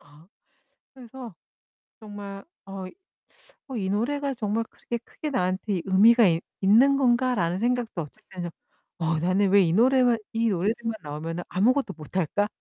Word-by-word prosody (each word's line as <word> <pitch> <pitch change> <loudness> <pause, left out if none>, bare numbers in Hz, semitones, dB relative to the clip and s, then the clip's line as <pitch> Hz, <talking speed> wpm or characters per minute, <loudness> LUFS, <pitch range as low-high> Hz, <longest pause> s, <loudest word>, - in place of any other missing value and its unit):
아 150 +5 -20 0.7
그래서 250 -5 -11 0.6
정말 205 -2 -9 0.2
어 195 -1 -7 0.8
'어 260 - -5
이 190 -3 -2
노래가 275 +7 -1
정말 225 -2 -1
그렇게 235 - -5
크게 300 +5 -7
나한테 185 -5 -1
의미가 220 +4 +6
이 165 -1 +1 0.2
있는 235 +8 +5
건가.'라는 240 -9 +1
생각도 240 -7 -1
어쩔 150 - -15
땐 185 -2 -7
좀 170 - -5 0.5
'어 160 -1 0
나는 185 +4 +2
왜 200 +1 +6
이 165 -3 +2
노래만 245 +1 +4 0.2
이 230 0 +1
노래들만 220 +5 -1
나오면은 160 +4 -5
아무것도 250 +9 +1
못할까?' 185 +5 -1
205 Hz, 300 characters per minute, -25 LUFS, 180-240 Hz, 0.8 s, 의미가